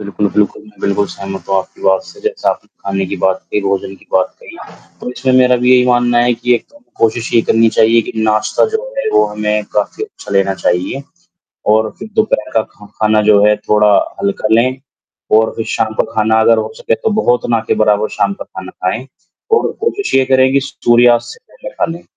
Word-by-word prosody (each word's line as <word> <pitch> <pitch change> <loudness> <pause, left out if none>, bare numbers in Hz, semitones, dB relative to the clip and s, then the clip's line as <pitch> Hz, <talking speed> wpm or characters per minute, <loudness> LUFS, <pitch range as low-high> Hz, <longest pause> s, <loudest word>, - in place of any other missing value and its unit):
बिल्कुल, 100 0 -2
बिल्कुल, 105 0 0
मैं 105 -1 -19
बिल्कुल 100 0 0
सहमत 95 -1 -8
हूँ 95 - +1
आपकी 95 - -8
बात 95 0 +2
से। - - -15
जैसे 440 +2 -2
आपने - - -3 0.2
खाने 95 0 -1
की 100 - -4
बात 95 0 +2
कही, 105 - 0
भोजन 100 -1 -2
की - - -21
बात 95 -1 +1
कही, - - -12 0.4
तो - - -5
इसमें 130 +1 -1
मेरा 125 0 +4
भी 125 +1 +1
यही 125 -1 +5
मानना 120 -1 +2
है 120 0 +2
कि 125 +1 +1
एक - - -1
तो 290 - -21
हमें 290 - -25
कोशिश 115 +1 0
ये 115 - +6
करनी 115 0 +4
चाहिए 115 +1 +3
कि - - -7
नाश्ता 110 -1 +1
जो 445 - 0 0.2
है - - -1
वो - - +4
हमें 105 0 -2
काफ़ी 105 - -1
अच्छा 425 - -14
लेना 100 -1 +2
चाहिए। 90 +9 -1 0.7
और 110 0 +2
फिर - - -8
दोपहर 220 - 0
का 110 - +3
खा 105 - -16
खाना 110 0 +3
जो 105 -1 +4
है 105 0 +4
थोड़ा 105 0 +4 0.3
हल्का 100 +2 -1
लें, 130 +3 +1 0.5
और 110 +1 +4
फिर 115 - -4
शाम 110 -1 -1
का - - +4
खाना 110 +1 +2
अगर 115 +1 +4
हो 110 0 -2
सके 115 - -1
तो 220 - -2
बहुत 120 0 +1
ना 115 -1 +2
के - - +1
बराबर 105 0 +2
शाम - - -1
का - - -8
खाना 95 0 -9
खाएँ। 110 +8 -3 0.5
और 450 - 0
कोशिश 430 -3 -2
ये 135 -1 +4
करें 130 0 +3
कि 140 - +4
सूर्यास्त 120 -3 +3
से 465 - -18
पहले - - -9
खालें, 165 +1 -3
110 Hz, 220 wpm, -15 LUFS, 105-125 Hz, 0.7 s, ये